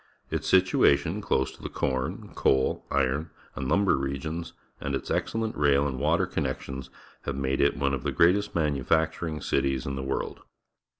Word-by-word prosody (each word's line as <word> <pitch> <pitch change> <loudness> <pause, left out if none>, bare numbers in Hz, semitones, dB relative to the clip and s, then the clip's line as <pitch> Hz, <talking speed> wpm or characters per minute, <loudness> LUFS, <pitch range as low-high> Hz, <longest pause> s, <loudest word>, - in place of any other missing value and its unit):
Its - - -2
situation, 90 -1 +4
close 65 -8 0
to - - -16
the - - -5
corn, 65 -1 -2
coal, 65 -1 +1
iron, 70 +4 0 0.3
and 65 0 -3
lumber 95 +1 +4
regions, 70 +5 -3 0.3
and - - -2
its - - -4
excellent 115 -1 -1
rail 70 -1 +3
and 65 -2 -4
water 80 +6 +2
connections 65 -5 -4 0.4
have - - -2
made 70 0 0
it 70 0 +3
one 70 0 +1
of 65 - -1
the - - -1
greatest 100 +5 +3
manufacturing 80 +1 0
cities 65 -2 0
in 70 - -3
the 65 - -3
world. 65 0 -3
70 Hz, 165 wpm, -27 LUFS, 65-85 Hz, 0.4 s, situation